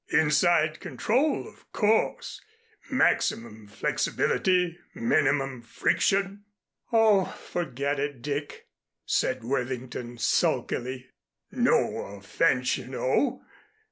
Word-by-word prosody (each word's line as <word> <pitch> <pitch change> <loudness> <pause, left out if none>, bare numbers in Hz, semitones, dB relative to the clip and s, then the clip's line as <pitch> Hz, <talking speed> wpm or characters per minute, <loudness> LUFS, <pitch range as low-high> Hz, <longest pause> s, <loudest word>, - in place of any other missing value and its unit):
Inside 155 0 +3
control, 225 - 0
of - - -18
course, 220 +1 0 0.5
maximum 110 -2 0
flexibility, 180 - 0 0.2
minimum 135 - +1
friction 195 - 0 0.2
" - - -44
"Oh, 220 -4 +5
forget 140 -4 -3
it, 140 -4 -4
Dick," 145 +1 -4 0.4
said - - 0
Worthington, 125 -1 -4
sulkily. 130 +2 -1 0.4
"No - - +2 0.2
offense, 125 +6 +1
you 125 - -9
know. 130 - 0
145 Hz, 85 wpm, -27 LUFS, 125-185 Hz, 0.5 s, Oh